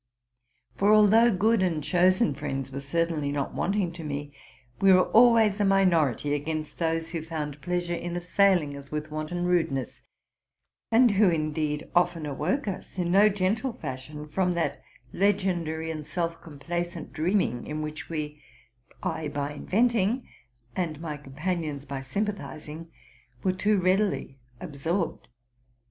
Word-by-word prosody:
For, 200 Hz, +2 st, +4 dB
although 215 Hz, +3 st, +6 dB
good 215 Hz, +2 st, +2 dB
and 165 Hz, -5 st, 0 dB
chosen 185 Hz, +1 st, +3 dB
friends 135 Hz, -2 st, -4 dB
were 135 Hz, -, -4 dB
certainly 150 Hz, +1 st, -1 dB
not 140 Hz, -1 st, -2 dB
wanting 195 Hz, -2 st, 0 dB
to 170 Hz, -1 st, -9 dB
me, 145 Hz, -1 st, -5 dB, 0.5 s
we 195 Hz, 0 st, +6 dB
were 185 Hz, -1 st, +5 dB
always 225 Hz, -3 st, +6 dB
a -, -, +3 dB
minority 170 Hz, -, +3 dB
against 155 Hz, +1 st, -3 dB
those 165 Hz, -1 st, -1 dB
who 165 Hz, -2 st, -3 dB
found 150 Hz, -3 st, -5 dB
pleasure 175 Hz, -1 st, -1 dB
in 175 Hz, 0 st, -4 dB
assailing 175 Hz, -4 st, +2 dB
us 140 Hz, 0 st, -10 dB
with 150 Hz, 0 st, -4 dB
wanton 155 Hz, +3 st, -3 dB
rudeness, 160 Hz, -7 st, 0 dB, 0.9 s
and 235 Hz, +1 st, +6 dB
who 200 Hz, -1 st, +4 dB
indeed 155 Hz, -2 st, -1 dB
often 175 Hz, -2 st, +2 dB
awoke 155 Hz, -, -1 dB
us 190 Hz, -1 st, -6 dB
in 175 Hz, -1 st, 0 dB
no 205 Hz, +3 st, +6 dB
gentle 210 Hz, +6 st, 0 dB
fashion 150 Hz, -, -7 dB
from 180 Hz, +3 st, 0 dB
that 160 Hz, -5 st, -1 dB, 0.3 s
legendary 175 Hz, -5 st, 0 dB
and 155 Hz, -2 st, -6 dB
_ -, -, -19 dB
self 165 Hz, +1 st, -3 dB
complacent 170 Hz, +2 st, -5 dB
dreaming 160 Hz, -, 0 dB
in 155 Hz, 0 st, -3 dB
which 155 Hz, 0 st, -6 dB
we 150 Hz, -2 st, -4 dB, 0.6 s
—I 155 Hz, -, -2 dB
by 145 Hz, 0 st, -3 dB
inventing, 230 Hz, -, +1 dB, 0.5 s
and 165 Hz, -5 st, -2 dB
my 160 Hz, -2 st, -4 dB
companions 150 Hz, +1 st, -4 dB
by 135 Hz, -1 st, -5 dB
sympathizing 160 Hz, -1 st, -5 dB, 0.3 s
— 120 Hz, 0 st, -31 dB
were 185 Hz, -, +3 dB
too 205 Hz, +3 st, +1 dB
readily 185 Hz, -6 st, 0 dB, 0.2 s
absorbed. 165 Hz, +3 st, -3 dB
165 Hz, 145 wpm, -27 LUFS, 150-190 Hz, 0.9 s, although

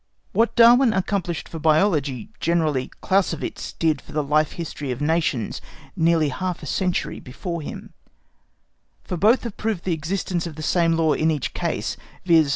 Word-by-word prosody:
What 230 Hz, +1 st, +2 dB
Darwin 240 Hz, +1 st, +7 dB
accomplished 185 Hz, -4 st, -2 dB
for 165 Hz, -, -7 dB
Biology 155 Hz, -, +1 dB
generally 155 Hz, -6 st, +1 dB
Clausewitz 195 Hz, 0 st, -1 dB
did 155 Hz, -4 st, 0 dB
for -, -, -14 dB
the 150 Hz, 0 st, 0 dB
Life 150 Hz, +2 st, +1 dB
History 150 Hz, -4 st, -5 dB
of 125 Hz, -1 st, -3 dB
Nations 150 Hz, -7 st, 0 dB, 0.3 s
nearly 165 Hz, -2 st, +3 dB
half 180 Hz, +5 st, -3 dB
a -, -, -5 dB
century 180 Hz, +5 st, -1 dB
before 170 Hz, +6 st, -5 dB
him, 145 Hz, -, -8 dB, 1.1 s
for -, -, -4 dB
both 215 Hz, +9 st, +4 dB
have 235 Hz, -4 st, -6 dB
proved 215 Hz, -5 st, -2 dB
the 180 Hz, -, 0 dB
existence 170 Hz, +2 st, -2 dB
of 160 Hz, -, -8 dB
the 155 Hz, -, -7 dB
same 170 Hz, 0 st, +2 dB
law 160 Hz, -2 st, +2 dB
in 160 Hz, -, +1 dB
each 150 Hz, -4 st, -2 dB
case, -, -, -2 dB, 0.3 s
viz. 165 Hz, -4 st, +5 dB
165 Hz, 165 wpm, -23 LUFS, 150-185 Hz, 1.1 s, Darwin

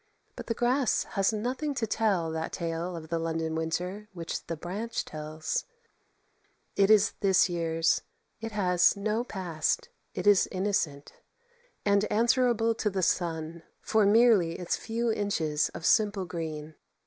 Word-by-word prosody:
But -, -, -8 dB
the 230 Hz, -, -1 dB
grass 250 Hz, +2 st, +1 dB
has 195 Hz, 0 st, +2 dB
nothing 255 Hz, +7 st, -2 dB
to 240 Hz, -, 0 dB
tell 200 Hz, -7 st, 0 dB
that 160 Hz, 0 st, -3 dB
tale 170 Hz, +1 st, -3 dB
of 160 Hz, -1 st, -8 dB
the 165 Hz, 0 st, -1 dB
London 165 Hz, -1 st, -2 dB
winter 180 Hz, +6 st, -3 dB
which 170 Hz, -2 st, -5 dB
the 165 Hz, -, -4 dB
branch 200 Hz, +8 st, -4 dB
tells; 155 Hz, +1 st, -4 dB, 1.1 s
it 195 Hz, 0 st, +3 dB
is 215 Hz, -2 st, +5 dB
this 190 Hz, -3 st, +4 dB
year's; 165 Hz, -1 st, +1 dB, 0.4 s
it 225 Hz, 0 st, -5 dB
has 180 Hz, -2 st, +3 dB
no 215 Hz, +3 st, -1 dB
past; 175 Hz, -9 st, -2 dB, 0.3 s
it -, -, -4 dB
is 205 Hz, -2 st, +5 dB
innocent, 185 Hz, -7 st, -2 dB, 0.7 s
and 200 Hz, 0 st, +3 dB
answerable 230 Hz, 0 st, +3 dB
to 220 Hz, -1 st, -1 dB
the 190 Hz, -2 st, -2 dB
sun 165 Hz, -1 st, -1 dB, 0.2 s
for 215 Hz, -2 st, +2 dB
merely 210 Hz, -6 st, +4 dB
its 180 Hz, -, -1 dB
few 230 Hz, 0 st, -2 dB
inches 160 Hz, -8 st, 0 dB
of 165 Hz, -, -6 dB
simple 205 Hz, -3 st, +3 dB
green. 160 Hz, -2 st, -5 dB
190 Hz, 145 wpm, -28 LUFS, 165-215 Hz, 1.1 s, is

